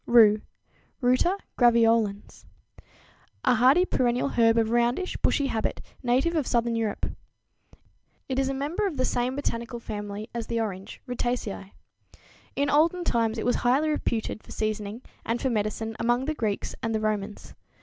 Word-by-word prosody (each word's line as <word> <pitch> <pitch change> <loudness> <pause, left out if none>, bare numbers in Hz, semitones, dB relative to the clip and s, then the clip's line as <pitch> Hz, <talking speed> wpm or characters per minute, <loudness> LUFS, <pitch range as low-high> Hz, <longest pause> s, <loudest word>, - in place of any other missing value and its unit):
=Rue= 215 -3 +6 0.6
(Ruta 255 +9 +2 0.2
graveolens, 230 -4 +3 0.3
Linn.), - - -21 0.6
a - - +5
hardy 260 +10 +5
perennial 250 -3 +1
herb 230 -2 +3
of 225 -1 +2
roundish, 240 +10 +1
bushy 285 - +1
habit, 225 -5 -1 0.2
native 260 +7 +1
of 300 -5 0
southern 235 -1 +1
Europe. 220 -3 -1 1.2
It 260 0 -1
is 270 0 +1
a - - -1
member 315 +10 -1
of 325 -7 -5
the 255 - +1
same 245 +2 0
botanical 235 -4 -3
family 210 -1 -6
as 235 -1 -4
the 230 - -1
orange, 195 -3 -5
Rutaceæ. 240 -5 -3 0.8
In 285 - +1
olden 325 +5 +3
times 230 -6 +1
it 220 - -3
was 245 - +2
highly 270 +6 +2
reputed 225 -7 -2
for - - -22
seasoning 215 +2 -3 0.2
and 230 +1 -1
for 265 - 0
medicine 220 +1 -2
among 240 +2 +1
the 310 - -1
Greeks 215 -8 -2
and 225 -1 -1
the - - +1
Romans. 210 -1 -3
235 Hz, 160 wpm, -26 LUFS, 220-265 Hz, 1.2 s, =Rue=